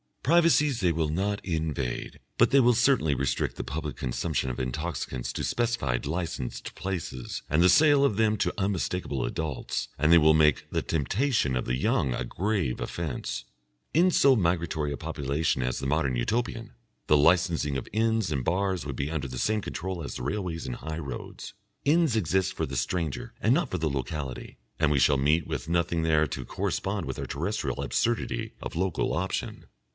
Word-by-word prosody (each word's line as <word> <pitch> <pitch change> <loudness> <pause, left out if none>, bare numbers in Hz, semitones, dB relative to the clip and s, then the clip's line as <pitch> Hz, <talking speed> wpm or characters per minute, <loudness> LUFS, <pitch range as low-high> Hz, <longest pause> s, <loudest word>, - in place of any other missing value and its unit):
Privacies 150 -4 +4
they 90 -4 +2
will 80 -1 0
not 100 +6 -1
invade, 80 -7 -3 0.2
but - - +5
they 140 - +6
will 125 -1 +5
certainly 120 - +3
restrict 70 0 -1
the - - -4
public 75 +2 -4
consumption 65 +2 -1
of 60 - -4
intoxicants 65 -2 -3
to - - -3
specified 115 - 0
licensed 80 -5 -4
places 85 -10 -5
and 75 +3 +3
the 90 - +6
sale 145 - +6
of 110 -8 +1
them 110 -1 +3
to - - 0
unmistakable 90 - -1
adults, 80 -5 -3
and 75 +1 +3
they 85 - +9
will 80 -1 +6
make 75 -2 +4
the - - 0
temptation 85 - 0
of 65 - -1
the 60 - 0
young 65 0 +1
a - - -2
grave 90 - -1
offence. 80 -7 -4 0.5
In 175 +4 +5
so 140 -6 +5
migratory 85 -6 0
a 70 - -3
population 70 +2 -1
as 65 -1 -1
the 70 - -3
Modern 70 -3 +1
Utopian, 115 - -2 0.3
the 75 - +5
licensing 80 -2 +3
of 65 - -5
inns 110 -3 +1
and 70 -4 -1
bars 95 0 0
would 70 -2 -4
be 70 +4 -2
under 75 -4 -2
the 65 -1 -6
same 110 0 +1
control 95 -3 -4
as 70 - -6
the - - -5
railways 90 -6 -3
and 60 -2 -4
high 80 0 -5
roads. 70 -4 -7 0.3
Inns 155 -2 +3
exist 95 -2 +1
for - - -2
the 70 0 -5
stranger 80 +5 -2
and 115 - +4
not 155 -2 +1
for 90 - -2
the 80 -2 0
locality, 70 -1 -4 0.2
and 80 -2 +3
we 70 - +3
shall 70 +1 +4
meet 75 +4 +2
with - - -4
nothing 85 -1 +1
there 80 -1 +3
to - - -5
correspond - - -2
with - - -5
our - - -4
terrestrial - - -2
absurdity 120 0 -1
of - - -6
Local 95 +1 0
Option. - - -3
80 Hz, 185 wpm, -27 LUFS, 70-100 Hz, 0.5 s, they